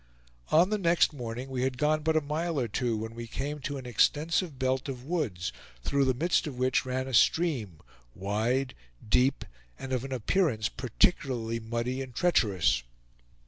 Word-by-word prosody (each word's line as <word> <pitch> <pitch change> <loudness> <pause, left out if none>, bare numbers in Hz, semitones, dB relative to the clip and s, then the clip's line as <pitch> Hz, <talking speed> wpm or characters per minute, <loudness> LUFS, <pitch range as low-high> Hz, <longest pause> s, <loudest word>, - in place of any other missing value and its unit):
On 175 +6 +4
the 215 - +1
next 170 -3 +3
morning 125 -1 -5
we 130 -1 -2
had 130 0 -1
gone 155 +2 +2
but 160 +1 +2
a - - +3
mile 155 +2 -2
or 120 - 0
two, 115 +1 -1
when 110 +1 -5
we 115 0 -7
came 145 +5 -4
to 140 +1 -4
an 130 - -8
extensive 150 - +1
belt 130 +1 0
of 125 -2 -6
woods, 115 - -2 0.3
through 140 - +2
the 130 -1 +2
midst 170 +4 +1
of 135 -4 -6
which 130 0 +1
ran 130 +1 -2
a 130 - -6
stream, 120 - +2 0.4
wide, 110 +7 0 0.3
deep, 125 +5 +2 0.3
and 130 0 -5
of 125 -1 0
an 135 - -6
appearance 130 - +1
particularly 115 - 0
muddy 120 +3 -3
and 130 -3 -8
treacherous. 95 - +2
130 Hz, 175 wpm, -29 LUFS, 115-150 Hz, 0.4 s, On